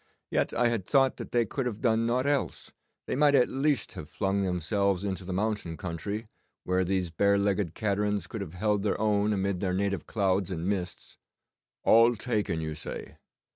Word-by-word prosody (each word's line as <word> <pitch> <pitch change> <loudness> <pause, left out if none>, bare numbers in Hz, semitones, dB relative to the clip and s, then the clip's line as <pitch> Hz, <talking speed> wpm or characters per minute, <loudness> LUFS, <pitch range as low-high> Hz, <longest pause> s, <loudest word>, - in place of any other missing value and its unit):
Yet - - +1
I 120 -1 +2
had 110 -6 -2
thought 135 -2 +3
that - - -7 0.2
could 135 - -1
they - - +1
have 110 -3 -8
done 115 -2 +2
nought 125 +3 +1
else, 145 -1 -1 0.3
they - - -2
might 145 +1 +4
at 125 - +4
least 140 +1 0
have 75 - -8
flung 100 0 0
themselves 95 +1 0
into 95 -1 -3
the 95 - -6
mountain 100 -4 -1
country, 100 +6 -4 0.4
where 90 0 +1
these 90 -2 -1
bare 100 +5 +3
legged 100 -4 0
caterans 105 -3 0
could 110 +3 -6
have 90 -3 -7
held 105 +1 +1
their 100 0 0
own 105 -1 +2
amid 100 -2 0
their 90 -1 -1
native 100 -3 -1
clouds 95 -3 +1
and 85 -1 -3
mists. 90 -3 -3 0.6
All 115 +1 +6
taken, 105 -7 -1
you 80 -1 -3
say! 75 - -6
100 Hz, 185 wpm, -28 LUFS, 95-110 Hz, 0.6 s, All